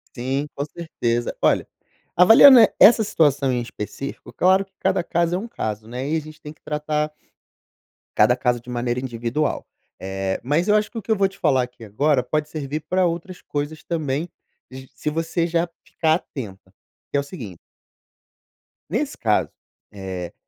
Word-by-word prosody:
Sim, 135 +3 -2
com 140 - -2
certeza. 120 -8 -3
Olha, - - +2 0.5
avaliando 225 +8 +9
e 225 - +5
essa 225 +1 +8
situação 145 -8 +2
em 125 -1 0
específico, 120 +3 -7
claro 190 +2 +3
que 195 - -38
cada 190 -1 +1
caso 170 +1 0
é - - 0
um 225 - -6
caso, 110 - -5
né? 125 +3 -5
E 160 - +1
a - - -2
gente 155 +1 -13
tem 150 - -9
que - - -35
tratar 150 0 -2 1.1
cada 110 +3 +5
caso 125 -1 0
de 120 - -24
maneira 120 0 -2
individual. 125 +3 -2 0.4
Eh, 95 0 -3
mais 150 +8 +1
eu 210 - +4
acho 215 0 +1
que 235 - -8
o - - -3
que 220 - -3
eu - - +5
vou 195 0 +3
te 195 - -18
falar 135 -6 +3
aqui 125 -1 -10
agora 130 +6 +1
pode 150 +4 -1
servir 150 0 -4
pra 185 0 +2
outras 175 +2 -4
coisas 150 +2 -4
também, 155 -1 -2 0.4
j 130 0 -10
se - - -2
você 165 +2 -1
já 170 0 0 0.2
ficar 160 -1 +1
atenta, 100 - -8 0.4
que - - +1
é - - +3
o - - -7
seguinte 120 - -9 1.3
Nesse - - -2
caso, - - +1 0.4
eh, 95 -3 -6
150 Hz, 180 wpm, -22 LUFS, 125-170 Hz, 1.3 s, avaliando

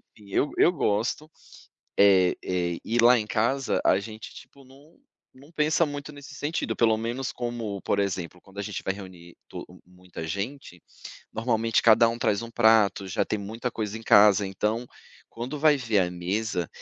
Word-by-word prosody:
enfim 105 -2 -17
eu 145 - +1
eu 175 - +5
gosto, 125 - -1 0.7
eh 95 -3 +5
eh 90 -2 -2
e 115 - -1
lá 120 +1 +6
em 105 - -5
casa 120 +4 0
a 95 - +4
gente 110 +1 -9
tipo 140 - -15
não 140 +5 -20 0.4
não 140 +4 -18
pensa 155 +1 +2
muito 145 0 -7
nesse 145 -1 -12
sentido, 150 +4 -3
pelo 110 -2 +3
menos 120 +4 -3
como 115 -5 -5
por 100 - 0
exemplo, 90 -3 -3
quando 95 0 -19
a - - -1
gente 105 -2 -6
vai 95 - -1
reunir 90 -3 -12
to - - -8 0.2
muita 90 -2 -10
gente. 100 - -6 0.5
Normalmente, 115 -1 0
cada 115 +1 +6
um 115 +1 -4
traz 105 -2 0
um 115 - -8
prato, 110 -4 +3
já 90 - 0
tem 110 - -3
muita 110 +5 -5
coisa 110 -2 -4
em - - -12
casa. 105 -2 +5
Então, 105 +5 -2 0.4
quando 125 +6 -6
vai 150 0 +4
ver 115 -6 +1
a 90 -1 0
mesa 90 0 -3
110 Hz, 180 wpm, -26 LUFS, 100-125 Hz, 0.7 s, lá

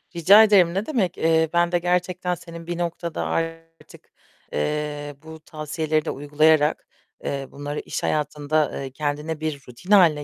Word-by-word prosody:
Rica 195 +6 +7
ederim, 190 -6 +5
ne 195 +3 -1
demek, 200 - -1
eee, 160 0 +2
ben 170 0 +2
de 175 - +2
gerçekten 180 +1 -1
senin 170 0 -11
bir 175 -1 -3
noktada 170 -1 -3
artık, 165 0 -5 0.4
eee, 145 - -3
bu 160 0 -10
tavsiyeleri 155 0 -2
de - - -2
uygulayarak, 150 +1 +2 0.4
eee, 140 -1 -3
bunları 145 +1 -5
iş - - -5
hayatında, 150 0 0
eee, 135 - -7
kendine 150 +3 -3
bir 155 -3 -3
rutin 125 - -10
hâline 165 -7 +5
160 Hz, 150 wpm, -23 LUFS, 150-175 Hz, 0.4 s, Rica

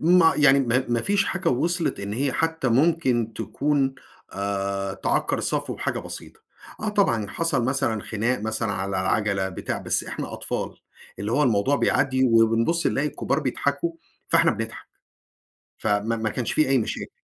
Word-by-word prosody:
ما 165 0 +5
يعني، 140 -2 +6
ما 130 +1 +1
ما 120 -1 +1
فيش 200 0 +2
حاجة 190 -3 -1
وصلِت 170 +7 0
إن 100 +1 -4
هي 135 +3 0
حتى 160 -5 0
ممكن 130 -4 +2
تكون، 140 -2 0 0.4
آآ، 100 -1 -2
تعكّر - - 0
الصفو - - -2
بحاجة - - -2
بسيطة. - - -9 0.4
آه 215 - -2
طبعًا 115 - +1
حصل 165 -5 0
مثلًا 120 -4 0
خناق 115 +2 -1
مثلًا 110 -1 -2
على 95 0 -3
العَجلة، 95 +1 0
بتاع، 95 - -4
بس - - -1
إحنا - - -5
أطفال، - - -4 0.4
اللي 105 +3 -3
هو 150 - +3
الموضوع 125 +3 +2
بيعدّي 130 -2 +2
وبنبُص 115 +8 +3
نلاقي 145 +2 +1
الكبار - - -1
بيضحكوا، 145 +4 -1 0.4
فاحنا - - +4
بنضحك. - - -5 0.9
فما 110 +2 0
ما 110 -1 -1
كانش 120 +2 -2
في 155 - +2
أي 135 - +4
مشاكل. 110 - -3
125 Hz, 155 wpm, -24 LUFS, 110-150 Hz, 0.9 s, يعني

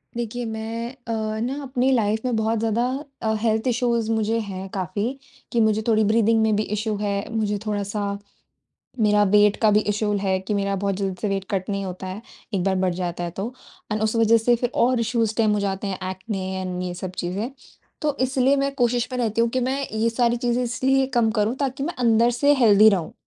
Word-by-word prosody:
देखिए 240 +1 -3
मैं 225 +1 -4 0.2
अ, 230 - -1 0.3
न 260 +5 -2
अपनी 260 -1 0
लाइफ़ 220 -3 +1
में 250 -2 0
बहुत 220 0 0
ज़्यादा 225 +2 +1 0.4
अ, 220 -1 0
हेल्थ 220 +2 +1
इश्यूज़ 235 -2 +1
मुझे 220 +1 +1
हैं 195 -2 -5
काफ़ी। 205 - -2 0.3
कि 235 - +1
मुझे 220 0 +2
थोड़ी 220 -1 +4
ब्रीथिंग 225 +1 +3
में 220 -1 +3
भी 215 - +1
इश्यू 215 +1 -2
है, 200 0 -2
मुझे 210 -2 0
थोड़ा-सा 200 -1 -2 0.8
मेरा 210 -1 +4
वेट 210 0 +5
का 215 -1 +5
भी 210 - +5
इश्यू 210 0 -1
है 190 -1 0
कि 195 +3 -4
मेरा 200 0 0
बहुत 195 0 -1
जल्दी 195 -1 -2
से 210 - 0
वेट 195 -1 -1
कट 190 0 -2
नहीं 200 -1 -1
होता 185 0 -6
है, 190 +4 -6 0.3
एक 190 -3 0
बार 195 0 +1
बढ़ 180 -1 +1
जाता 175 -1 -3
है 170 - -3
तो। 220 +6 -3 0.4
एंड 215 0 -1
उस 220 +1 0
वजह 230 0 +5
से 240 +2 +3
फिर 240 +1 -1
और 250 0 +3
इश्यूज़ 230 -1 +1
स्टेम 220 -1 +2
हो 210 - +1
जाते 200 0 -2
हैं 190 - -3
ऐक्ने 190 0 -5 0.2
एंड 180 -1 -4
ये 180 -1 -3
सब 185 +1 -6
चीज़ें। 200 +9 -3 0.5
तो 295 -2 0
इसलिए 260 +1 +3
मैं 275 0 0
कोशिश 245 -1 +1
में 255 - -3
रहती 230 -1 +1
हूँ 235 - +2
कि 255 +2 -1
मैं 270 +2 -1
ये 220 +1 +1
सारी 235 0 +1
चीज़ें 245 +1 0
इसलिए 265 +3 +1
कम 235 -2 +3
करूँ 215 +2 0
ताकि 270 0 -2
मैं 340 - -2
अंदर 235 -1 +3
से 285 +4 +3
हेल्थी 220 -4 +6
रहूँ। 180 -6 -1
220 Hz, 215 wpm, -23 LUFS, 200-240 Hz, 0.8 s, हेल्थी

